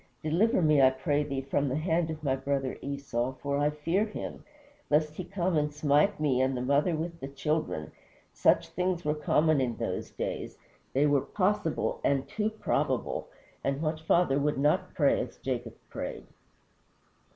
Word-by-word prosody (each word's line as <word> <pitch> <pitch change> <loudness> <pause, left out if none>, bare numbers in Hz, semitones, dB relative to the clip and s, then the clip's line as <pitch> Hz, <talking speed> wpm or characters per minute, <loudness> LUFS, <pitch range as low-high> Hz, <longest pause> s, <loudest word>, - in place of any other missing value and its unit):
Deliver 180 +6 +2
me, 150 -2 +5
I 130 - +8
pray 135 +3 0
thee, 135 -2 -3
from 140 +1 0
the 130 - -1
hand 165 +1 +1
of 155 -1 -6
my 135 -2 +2
brother 135 -1 -2
Esau, 135 -3 -2
for 140 +2 -2
I 145 +1 +3
fear 165 +7 0
him, 210 - -6 0.5
lest 150 +1 +2
he 185 - -5
come 180 0 -1
and 150 -1 +1
smite 150 +6 +2
me 135 -4 +2
and 130 0 +1
the - - -2
mother 140 +6 +2
with 165 +2 -4
the 135 - -5
children." 140 - -2 0.4
Such - - +3
things 180 -2 -1
were 150 - +2
common 150 0 +2
in 120 -3 -1
those - - -3
days - - -4 0.4
they 140 +3 +3
were 145 -2 +3
possible 185 -3 0
and 135 -1 +1
too 215 0 -1
probable 220 0 -1 0.4
and 135 0 0
what 155 0 -1
father 160 -3 +3
would 145 0 0
not 155 +6 +1
pray 145 -3 +3
as - - -7
Jacob 120 -3 -4 0.2
prayed? - - -5
150 Hz, 175 wpm, -29 LUFS, 135-160 Hz, 0.5 s, I